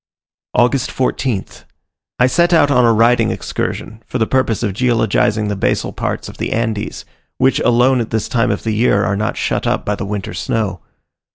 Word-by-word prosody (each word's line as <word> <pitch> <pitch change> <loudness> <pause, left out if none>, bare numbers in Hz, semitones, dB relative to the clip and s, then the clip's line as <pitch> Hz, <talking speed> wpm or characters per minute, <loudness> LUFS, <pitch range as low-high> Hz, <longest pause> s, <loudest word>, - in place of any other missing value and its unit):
August 125 +2 +2
14th. 130 -4 -2 0.5
I 125 - +4
set 170 +7 +2
out 145 -3 +4
on 125 -3 +4
a 115 - +5
riding 115 0 +3
excursion, 95 +4 -4
for - - -3
the 110 - +2
purpose 120 -3 0
of 105 -4 -1
geologizing 110 -2 +1
the 105 - -2
basal 95 - -1
parts - - -3
of - - -11
the - - -2
Andes, 110 -2 -3 0.3
which 130 +1 +2
alone 125 +1 +3
at 115 - -4
this 110 -1 -1
time 120 0 +1
of 100 - -2
the 110 - -1
year 105 -2 +2
are 100 - 0
not 105 +2 -2
shut - - -1
up - - -1
by 105 - 0
the 100 - -4
winter 100 -2 -4
snow. 95 0 -2
115 Hz, 190 wpm, -17 LUFS, 105-125 Hz, 0.5 s, a